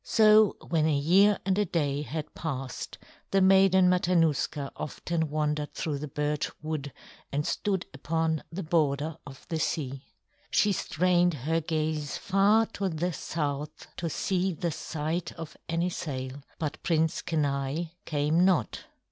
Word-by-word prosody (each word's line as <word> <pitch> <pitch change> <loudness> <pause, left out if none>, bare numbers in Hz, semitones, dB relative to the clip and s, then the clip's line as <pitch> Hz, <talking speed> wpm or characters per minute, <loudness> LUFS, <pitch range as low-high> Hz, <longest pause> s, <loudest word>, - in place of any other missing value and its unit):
So 215 -1 +5
when 160 -2 +2
a 150 -2 +2
year 195 +8 +5
and 195 +1 +2
a 210 - +3
day 145 -5 0
had 150 +2 -5
passed, 135 -5 -5 0.3
the 195 - +3
Maiden 190 -1 +6
Matanuska 165 -5 +2
often 160 +1 -3
wandered 150 0 -1
through 150 -3 -2
the 150 - -5
birch 150 0 -1
wood 155 -3 -3 0.4
and 145 +2 -1
stood 195 -3 -1
upon 160 +2 -1
the 190 +4 -4
border 155 -1 +1
of 135 -1 -12
the 160 - -1
sea. 135 -3 -2 0.4
She 210 - +3
strained 175 -1 +2
her 165 +1 +1
gaze 155 -2 -2
far 205 +3 +3
to 195 -1 -1
the 175 +2 -2
south 150 -2 -4
to 170 - -2
see 185 +3 0
the 170 +1 -2
sight 160 +3 -3
of 165 -2 -8
any 170 +2 0
sail; 130 -4 -5 0.2
but 155 -3 -4
Prince 160 -1 +1
Kenai 145 +1 -1
came 150 +3 +2
not. 180 - +1
160 Hz, 145 wpm, -28 LUFS, 150-180 Hz, 0.4 s, Maiden